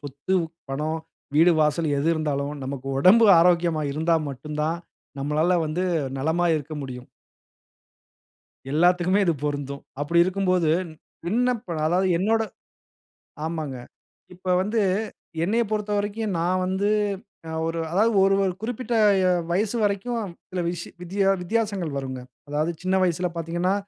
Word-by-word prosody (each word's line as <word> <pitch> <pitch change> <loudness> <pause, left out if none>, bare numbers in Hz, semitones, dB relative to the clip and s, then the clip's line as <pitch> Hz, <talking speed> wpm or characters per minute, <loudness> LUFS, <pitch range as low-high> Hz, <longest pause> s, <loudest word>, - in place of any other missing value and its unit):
சொத்து, 145 +6 -3 0.4
பணம், 155 +4 -2 0.4
வீடு 170 +3 +6
வாசல் 150 +1 +2
எது 155 +4 +1
இருந்தாலும், 145 -2 -2
நமக்கு 135 0 -5
உடம்பு 215 +8 +7
ஆரோக்கியமா 170 -2 +3
இருந்தா 160 +3 +2
மட்டும் 150 +3 -7
தான், 165 +2 0 0.4
நம்மளால 155 +5 +2
வந்து 165 +4 -1 0.3
நலமா 160 +5 +1
இருக்க 155 +1 -6
முடியும். 125 -2 -8 1.6
எல்லாத்துக்குமே 180 +4 +3
இது 170 - +3
பொருந்தும், 140 -1 -3 0.2
அப்படி 160 +4 +1
இருக்கும்போது, 185 -3 +1 0.6
விண்ணப்ப 235 -2 0
அதாவது 185 +3 +2
என்னோட 225 +4 +2 1.0
ஆமாங்க, 155 -5 -4 0.6
இப்போ 185 +1 -3
வந்து, 215 +3 0 0.6
என்னையப் 220 +4 +1
பொறுத்தவரைக்கும் 210 -1 -1
நான் 180 +2 +1
வந்து 190 +2 0 0.6
அ - - -5
ஒரு 165 0 -2
அதாவது 215 +6 +3
ஒரு 195 0 +4
ஒரு 190 -2 0
குறிப்பிட்ட 240 +1 -3 0.3
எ - - +4 0.2
வயசு 210 +5 0
வரைக்கும் 205 0 -1 0.2
சில 185 -1 -2
விஷ்ஷி 170 -1 -4
வித்யா 195 +2 +1
வித்தியாசங்கள் 200 -4 -1
வருங்க. 130 -1 -4 0.3
அதாவது 150 +3 0
சின்ன 185 +1 +1
வயசில 180 0 +1
பார்த்தீங்கனா, 170 +3 -1
175 Hz, 125 wpm, -24 LUFS, 155-195 Hz, 1.6 s, உடம்பு